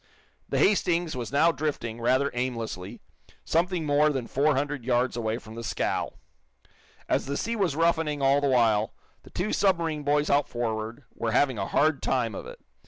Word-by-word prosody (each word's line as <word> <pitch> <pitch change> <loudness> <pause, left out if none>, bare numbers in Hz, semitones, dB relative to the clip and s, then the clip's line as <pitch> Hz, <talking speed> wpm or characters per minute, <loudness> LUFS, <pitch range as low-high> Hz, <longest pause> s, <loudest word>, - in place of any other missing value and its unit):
The - - 0
"Hastings" 175 -5 +2
was 120 -2 -5
now 160 +4 +4
drifting, 135 -6 -3
rather 130 +4 +2
aimlessly, 115 -7 -4 0.4
something 170 0 0
more 150 +1 +4
than 135 -5 -2
four 145 +4 +2
hundred 140 -1 -2
yards 125 0 +1
away 115 -1 -1
from 110 -2 -11
the 115 +1 -7
scow. 105 - -2 0.9
As - - 0
the 140 - -2
sea 230 +1 -2
was 190 -9 0
roughening 160 -2 +1
all 140 +1 +3
the 140 - +1
while, 115 -5 +2 0.3
the - - -16
two 190 +4 -2
submarine 170 -6 +1
boys 145 +1 +1
out 145 0 +2
forward 115 +1 -3
were 115 -1 -2
having 130 -4 +2
a 95 - -2
hard 155 -1 +2
time 120 -4 0
of - - -7
it. - - -10
140 Hz, 175 wpm, -27 LUFS, 120-155 Hz, 0.9 s, now